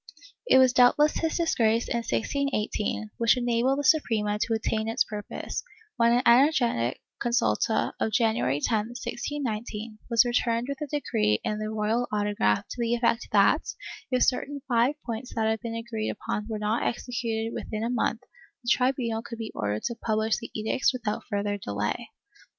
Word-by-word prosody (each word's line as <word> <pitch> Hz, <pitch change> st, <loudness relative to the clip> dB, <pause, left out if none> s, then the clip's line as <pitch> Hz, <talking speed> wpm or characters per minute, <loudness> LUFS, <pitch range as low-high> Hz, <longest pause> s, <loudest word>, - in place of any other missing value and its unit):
It 260 Hz, -, +6 dB
was 260 Hz, -1 st, +6 dB
doubtless 275 Hz, +5 st, +5 dB
his 325 Hz, -1 st, -1 dB
disgrace, 230 Hz, -9 st, +2 dB
in -, -, -1 dB
1618, 220 Hz, -3 st, -1 dB
which 230 Hz, +2 st, +4 dB
enabled 245 Hz, +2 st, +1 dB
the 290 Hz, -, -1 dB
Suprema 220 Hz, -9 st, +2 dB
to 225 Hz, -, 0 dB
attain 220 Hz, 0 st, -1 dB
its 225 Hz, +3 st, +2 dB
purpose, 210 Hz, -2 st, -5 dB, 0.3 s
when 235 Hz, -1 st, +4 dB
an 245 Hz, +1 st, +3 dB
energetic 240 Hz, -, +3 dB, 0.2 s
consulta 220 Hz, -, +1 dB
of 220 Hz, -, 0 dB
January 215 Hz, -, +1 dB
10, 215 Hz, +5 st, 0 dB
1619, 225 Hz, -5 st, -4 dB
was 235 Hz, 0 st, +5 dB
returned 240 Hz, 0 st, 0 dB
with 280 Hz, +1 st, -4 dB
a 300 Hz, -, -2 dB
decree 105 Hz, -, 0 dB
in 210 Hz, 0 st, -2 dB
the 215 Hz, 0 st, -3 dB
royal 220 Hz, +3 st, 0 dB
autograph 205 Hz, -, +1 dB
to -, -, -7 dB
the 235 Hz, 0 st, +1 dB
effect 235 Hz, -1 st, +1 dB
that, -, -, +5 dB, 0.5 s
if 255 Hz, -1 st, +2 dB
certain 280 Hz, +2 st, 0 dB
five 245 Hz, +3 st, +2 dB
points 235 Hz, +1 st, -5 dB
that 220 Hz, -2 st, +1 dB
had 220 Hz, 0 st, +1 dB
been 230 Hz, 0 st, -5 dB
agreed 230 Hz, -1 st, -3 dB
upon 210 Hz, 0 st, -4 dB
were 220 Hz, -, -2 dB
not 210 Hz, +2 st, 0 dB
executed 230 Hz, -2 st, -2 dB
within 215 Hz, 0 st, -4 dB
a 230 Hz, -, -1 dB
month, 240 Hz, -1 st, 0 dB, 0.4 s
the 240 Hz, -, -2 dB
tribunal 250 Hz, -3 st, +1 dB
could 230 Hz, 0 st, -8 dB
be 225 Hz, -1 st, -5 dB
ordered 105 Hz, -1 st, -2 dB
to -, -, -1 dB
publish 220 Hz, -1 st, 0 dB
the -, -, -8 dB
edicts 220 Hz, +5 st, +1 dB
without 240 Hz, -5 st, -3 dB
further 205 Hz, -1 st, -1 dB
delay 100 Hz, -, -3 dB
230 Hz, 165 wpm, -27 LUFS, 215-245 Hz, 0.5 s, It